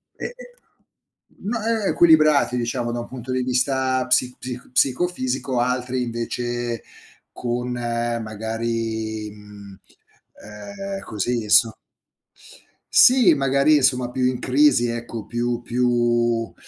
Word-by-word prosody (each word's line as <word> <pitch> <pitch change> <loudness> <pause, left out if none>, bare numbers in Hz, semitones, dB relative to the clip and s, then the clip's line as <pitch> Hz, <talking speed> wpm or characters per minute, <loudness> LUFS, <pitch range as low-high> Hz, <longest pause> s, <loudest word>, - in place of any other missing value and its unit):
e - - -7
e 485 - -5 0.9
mhmm, 200 - -9
no, 225 -2 -3
e 225 -2 0
e - - +1
equilibrati, 155 -6 +4
diciamo 120 0 -2
da 120 - -3
un 120 - -6
punto 130 0 -8
di 130 0 0
vista 130 0 0
psi 125 0 +2
psic 125 -1 -8
psicofisico, 130 -2 0
altri 125 +1 -1
invece 120 -1 -3 0.5
con 125 0 -3
magari, 115 -2 -3
mhmm 105 -2 -14 0.6
ehm, 195 - -7
così 115 +2 -2
insom 110 +2 +5 1.2
Sì, 245 -9 +7
magari 140 +2 +3
insomma 130 -3 +2
più 130 +1 -3
in 125 -1 0
crisi 130 -2 +3
ecco, 115 -2 -5
più 120 0 -2
più 120 -1 0
125 Hz, 120 wpm, -22 LUFS, 115-130 Hz, 1.2 s, Sì